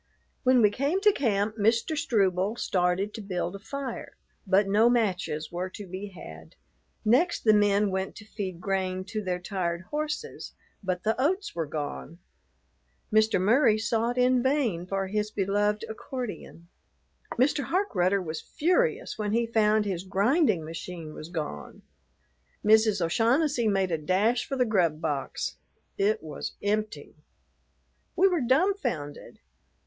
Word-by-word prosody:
When 255 -2 +4
we 210 - +5
came 280 - 0
to 420 0 +6
camp, 215 - 0
Mr. 225 +7 +2
Struble 200 -7 +1
started 185 0 0
to 225 - -6
build 185 -2 -3
a - - -7
fire; 260 +3 -6 0.3
but 195 +1 +4
no 215 +4 +4
matches 185 -10 0
were 180 +2 -3
to 205 +2 -9
be 190 +2 -6
had. 80 - -12 0.5
Next, 275 +11 +3
the 215 - +5
men 205 -1 +3
went 190 0 -3
to 210 - -11
feed 190 -5 -5
grain 185 -1 -1
to 215 0 -3
their 180 -2 -1
tired 175 -2 -3
horses, 305 +9 -4 0.3
but 185 -2 -2
the 220 - +2
oats 375 +8 0
were 165 -2 -3
gone. 150 +2 -5 1.0
Mr. 220 -2 +4
Murry 220 +3 +4
sought 230 +2 0
in 250 0 +4
vain 245 - 0
for 195 0 -1
his 210 +2 -1
beloved 205 +2 0
accordion. 220 -6 -7 0.7
Mr. 275 +3 +1
Harkrudder 200 - +1
was 155 -2 -5
furious 440 - 0
when 210 -1 -1
he 235 +1 +2
found 215 -2 +2
his 185 -3 -3
grinding 200 - +2
machine 165 0 -7
was 155 - -9
gone. 150 - -6 0.8
Mrs. 215 -4 +4
O'Shaughnessy 240 - +2
made 195 -3 +1
a 165 - 0
dash 205 +10 +1
for 275 - -2
the 255 -1 +2
grub 175 -8 +1
box. 145 -4 -3 0.4
It 205 -1 +1
was 150 -3 -6
empty. 210 -7 -2 1.0
We 375 +2 +5
were 355 -5 +1
dumbfounded. 260 - -1
210 Hz, 145 wpm, -27 LUFS, 185-240 Hz, 1.0 s, to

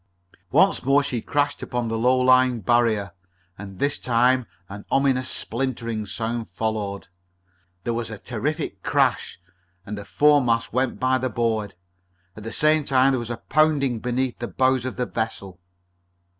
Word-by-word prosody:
Once - - +3
more 140 +2 +3
she 125 -5 -3
crashed 145 +3 -1
upon 120 -2 -3
the 115 - -2
low 125 +3 +3
lying 130 -1 +4
barrier, 110 -2 +1 0.4
and 95 0 -10
this 140 +6 0
time 125 0 +2 0.2
an 100 +1 -9
ominous 135 -2 +1
splintering 115 -3 -3
sound 115 +1 -4
followed. 100 0 -3 0.8
There 120 - -1
was 115 -1 -3
a 110 - -7
terrific 145 +9 -4
crash, - - 0 0.5
and 105 - -5
the 105 - -7
foremast 125 -4 +2
went 130 +1 0
by 130 0 +2
the 130 0 -1
board. 110 -3 -1 0.6
At 110 - -10
the 115 - -6
same 155 0 +3
time 135 -1 +3
there 130 - 0
was 120 -1 -6
a 120 - -3
pounding 145 -5 +2
beneath 125 +1 -2
the 120 - -3
bows 130 -1 +1
of 130 - -4
the 125 - -1
vessel. 105 -6 -5
120 Hz, 155 wpm, -23 LUFS, 110-130 Hz, 0.8 s, lying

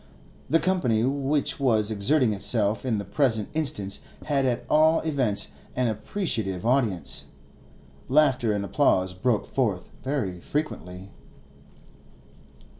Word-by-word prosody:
The 165 - +4
company 145 -12 +1
which 140 +3 -1
was 110 -6 +2
exerting 110 +3 +2
itself 105 +2 +3
in 115 -4 0
the 100 - -4
present 110 -2 0
instance 105 -11 +1 0.3
had 140 -3 +1
at 120 -1 -2
all 155 +1 +4
events 135 -10 0 0.3
an 125 -2 +1
appreciative 110 - -3
audience; 120 -7 0 0.8
laughter 130 -5 +3
and 100 -1 -2
applause 95 -8 +1
broke 105 +4 0
forth 105 -9 -2
very 120 -10 -3
frequently. 95 - -5
120 Hz, 115 wpm, -25 LUFS, 100-140 Hz, 0.8 s, The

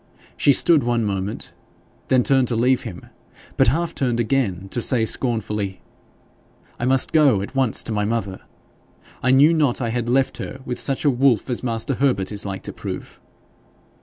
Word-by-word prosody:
She 145 - +3
stood 155 +3 +4
one 120 -2 0
moment, 100 0 -4 0.5
then 130 -1 +3
turned 135 -1 +2
to 120 - -1
leave 125 +3 +2
him, 95 -7 -9 0.5
but - - +3
half 165 +8 0
turned 120 -3 -1
again 110 -6 -1
to 120 - -3
say 115 -2 +3
scornfully 105 -5 -2 1.0
'I 120 - -2
must 130 +1 +2
go 140 -11 +3
at 100 - -8
once 130 -5 +2
to - - -3
my 105 -1 -1
mother! 105 -3 -3 0.8
I 130 - 0
knew 140 +5 +5
not 150 -6 +1
I 120 -3 -2
had 120 0 -2
left 135 +2 +1
her 135 - -7
with 125 - -3
such 135 +2 0
a 145 - +5
wolf 130 -2 +1
as 120 - -1
master 115 +3 -2
Herbert 125 -9 0
is 105 -1 -2
like 95 -1 -6
to - - -5
prove!' - - -8
120 Hz, 180 wpm, -21 LUFS, 105-135 Hz, 1.0 s, knew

